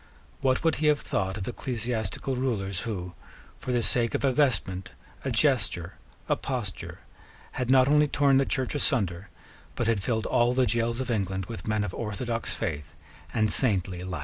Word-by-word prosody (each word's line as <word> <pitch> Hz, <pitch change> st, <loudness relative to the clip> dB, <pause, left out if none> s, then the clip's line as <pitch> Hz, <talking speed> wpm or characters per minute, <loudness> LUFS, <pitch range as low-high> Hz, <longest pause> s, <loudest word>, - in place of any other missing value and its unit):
What 130 Hz, -1 st, +1 dB
would 165 Hz, -2 st, +2 dB
he 150 Hz, -, +1 dB
have 150 Hz, -1 st, +3 dB
thought 95 Hz, 0 st, -2 dB
of 95 Hz, -, -5 dB
ecclesiastical 120 Hz, +1 st, -2 dB
rulers 100 Hz, -8 st, -1 dB
who, 90 Hz, -4 st, -4 dB, 0.5 s
for 130 Hz, -, -4 dB
the 120 Hz, -1 st, +1 dB
sake 115 Hz, 0 st, +3 dB
of -, -, -1 dB
a 135 Hz, -2 st, +3 dB
vestment, 95 Hz, -10 st, +1 dB, 0.3 s
a -, -, -1 dB
gesture, -, -, +1 dB, 0.3 s
a -, -, +3 dB
posture, 120 Hz, -8 st, -5 dB, 0.5 s
had 125 Hz, -1 st, -3 dB
not 130 Hz, 0 st, +6 dB
only 150 Hz, +1 st, +5 dB
torn 140 Hz, -1 st, +3 dB
the 135 Hz, -, +3 dB
Church 130 Hz, -1 st, 0 dB
asunder, 100 Hz, -, 0 dB, 0.5 s
but 120 Hz, -, -1 dB
had 110 Hz, -3 st, +1 dB
filled 110 Hz, +2 st, -1 dB
all 120 Hz, +1 st, +3 dB
the 130 Hz, 0 st, +3 dB
gaols 115 Hz, +2 st, 0 dB
of 130 Hz, -, -3 dB
England 95 Hz, -4 st, -1 dB
with 110 Hz, -4 st, -8 dB
men 110 Hz, -1 st, +1 dB
of 105 Hz, -, -4 dB
orthodox 115 Hz, +1 st, -3 dB
faith 75 Hz, -1 st, -4 dB, 0.4 s
and 110 Hz, -2 st, +1 dB
saintly 95 Hz, -7 st, +1 dB
life? 90 Hz, -3 st, -4 dB
115 Hz, 175 wpm, -27 LUFS, 95-130 Hz, 0.5 s, not